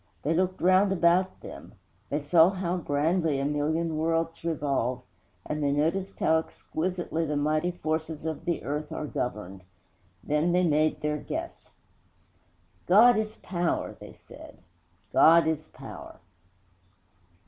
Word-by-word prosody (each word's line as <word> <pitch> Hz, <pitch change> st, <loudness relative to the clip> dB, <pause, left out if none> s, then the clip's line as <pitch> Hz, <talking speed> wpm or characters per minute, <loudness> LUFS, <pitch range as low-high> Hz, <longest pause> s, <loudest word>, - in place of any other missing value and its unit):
They 155 Hz, -, +1 dB
looked 185 Hz, +2 st, 0 dB
round 185 Hz, +2 st, +4 dB
about 185 Hz, +1 st, +2 dB
them; -, -, -11 dB, 0.3 s
they 145 Hz, +1 st, -2 dB
saw 165 Hz, +3 st, +5 dB
how 185 Hz, -2 st, -2 dB
grandly 155 Hz, -1 st, 0 dB
a 135 Hz, -, -1 dB
million 155 Hz, +2 st, -1 dB
worlds 165 Hz, +1 st, -1 dB
revolve, 140 Hz, -6 st, -1 dB, 0.4 s
and 150 Hz, 0 st, -3 dB
they 140 Hz, -1 st, +1 dB
noticed 165 Hz, +7 st, -1 dB
how 160 Hz, -, +3 dB
exquisitely 170 Hz, +1 st, -4 dB
the 150 Hz, 0 st, -1 dB
mighty 155 Hz, +4 st, +1 dB
forces 160 Hz, -2 st, -4 dB
of 160 Hz, -1 st, -4 dB
the 170 Hz, -2 st, -2 dB
earth 150 Hz, +2 st, -4 dB
are 155 Hz, -, -4 dB
governed. 105 Hz, -9 st, -5 dB, 0.6 s
Then 150 Hz, +4 st, +1 dB
they 180 Hz, +1 st, +3 dB
made 155 Hz, -1 st, +1 dB
their 150 Hz, 0 st, -1 dB
guess. 335 Hz, -, -6 dB, 1.2 s
'God 225 Hz, +6 st, +7 dB
is 215 Hz, 0 st, -2 dB
Power,' 175 Hz, -2 st, -2 dB
they -, -, -11 dB
said, -, -, -14 dB, 0.6 s
'_God 165 Hz, +1 st, +6 dB
is 160 Hz, -1 st, -2 dB
Power! -, -, -11 dB
160 Hz, 135 wpm, -27 LUFS, 150-175 Hz, 1.2 s, God